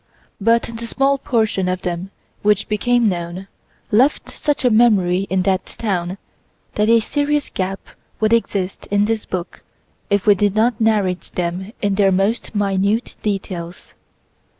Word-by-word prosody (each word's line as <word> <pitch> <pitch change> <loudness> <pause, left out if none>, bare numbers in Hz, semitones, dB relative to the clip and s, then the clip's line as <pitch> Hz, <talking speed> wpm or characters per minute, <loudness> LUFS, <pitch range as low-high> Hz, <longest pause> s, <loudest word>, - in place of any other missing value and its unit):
But 230 +3 +3
the 230 0 -6
small 275 +3 +1
portion 220 -7 0
of 185 0 -3
them 175 +1 -3 0.3
which 210 -1 +2
became 240 +2 +2
known 175 0 -3 0.4
left 255 +8 +2
such 295 -3 -1
a 250 - +4
memory 195 -5 +3
in 190 0 +1
that 190 -1 +1
town 185 -4 -3 0.6
that 210 +1 +1
a 230 0 +6
serious 290 +5 -1
gap 190 +1 -2 0.4
would 220 +1 +2
exist 195 -5 -1
in 205 0 +2
this 225 0 -1
book 185 -1 -5 0.5
if 200 -1 +1
we 210 - +7
did 205 +1 0
not 230 +1 +2
narrate 205 -5 +1
them 180 +3 -3
in 200 -1 +2
their 195 -1 +3
most 195 +5 0
minute 200 +3 0
details. 185 -4 -4
205 Hz, 150 wpm, -19 LUFS, 185-230 Hz, 0.6 s, we